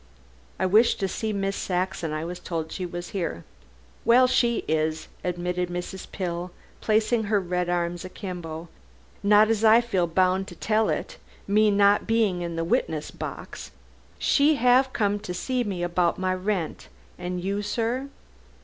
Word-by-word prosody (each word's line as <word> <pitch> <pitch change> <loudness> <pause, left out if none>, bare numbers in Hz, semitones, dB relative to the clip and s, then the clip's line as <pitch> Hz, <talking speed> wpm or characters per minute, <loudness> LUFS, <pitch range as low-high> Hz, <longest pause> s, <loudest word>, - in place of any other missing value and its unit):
"I - - 0
wish 215 +6 +5
to 195 - -1
see 220 +3 -3
Miss 195 -1 -1
Saxon. 180 -3 -2
I 155 +1 -3
was 175 +1 -6
told 165 -3 -4
she 185 -2 -4
was 175 0 -6
here." 170 - -3 0.6
"Well, 240 +3 +6
she 240 -2 +2
is," 155 0 0 0.2
admitted 180 0 -2
Mrs. 180 +2 -6
Pill, 175 -1 -3 0.3
placing 220 +1 +2
her 205 0 +2
red 180 -1 -2
arms 175 0 -1
akimbo, 175 -4 -6 0.5
"not 210 +1 +5
as 225 -1 0
I 220 +1 +7
feel 195 -7 0
bound 185 +2 +2
to 175 - -10
tell 220 +4 +1
it, - - -3 0.3
me 210 +2 +4
not 200 0 +4
being 220 -6 +2
in 170 -1 -4
the 165 - -1
witness 160 -2 -1
box. - - -7 0.5
She 290 +1 +3
'ave 250 +2 +4
come 205 -3 0
to 180 -3 -6
see 250 +6 -1
me 190 -5 -3
about 175 0 +1
my 185 0 0
rent. 185 -2 -2 0.3
An' 180 0 -3
you, 195 +3 -2
sir?" 235 +6 -2
185 Hz, 160 wpm, -25 LUFS, 175-215 Hz, 0.6 s, I